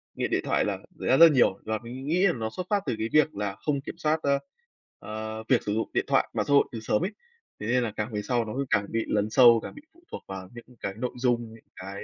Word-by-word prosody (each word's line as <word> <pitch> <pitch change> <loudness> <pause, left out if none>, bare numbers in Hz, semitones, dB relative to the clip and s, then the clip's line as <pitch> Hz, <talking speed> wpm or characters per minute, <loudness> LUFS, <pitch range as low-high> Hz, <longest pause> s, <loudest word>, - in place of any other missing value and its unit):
nghiện - - -2
điện - - +1
thoại - - +1
là - - -1 0.2
xảy - - -4
ra 130 - +5
rất 165 - +10
là - - +3
nhiều 120 -7 +3
và 110 -1 -2
mình 130 +3 -8
nghĩ 180 +5 +3
là - - +2
nó 110 -2 -3
xuất 180 -1 -4
phát 205 -2 +1
từ - - -1
cái 110 - -1
việc 155 -3 +3
là 100 -1 -3
không 140 -2 0
kiểm - - -7
soát, 155 -1 +1
a, 140 0 +2 0.6
ờ, 110 +1 -6
việc 130 - +3
sử 105 - -2
dụng 110 - -1
điện - - +1
thoại, - - +2
mạng - - -1
xã 145 - +2
hội 140 - +6
từ 115 - -5
sớm 105 -1 0
ấy. 205 - -3 0.5
Thế 105 - -5
nên 125 +1 +2
là 110 - -2
càng 105 +1 -4
về 105 - -1
sau 120 0 0
nó 110 - -6
cứ 140 0 -1
càng 100 0 +2
bị 115 0 -1
lấn 105 0 0
sâu, 120 -1 +7
càng - - -8
bị 290 - -11
phụ 340 +1 -24
thuộc - - -7
vào 95 -1 -7
những 120 - -11
cái 100 - -4
nội 125 +1 -2
dung, 120 -2 0
những 115 - -16
cái, 95 +2 -8
115 Hz, 295 wpm, -27 LUFS, 110-140 Hz, 0.6 s, rất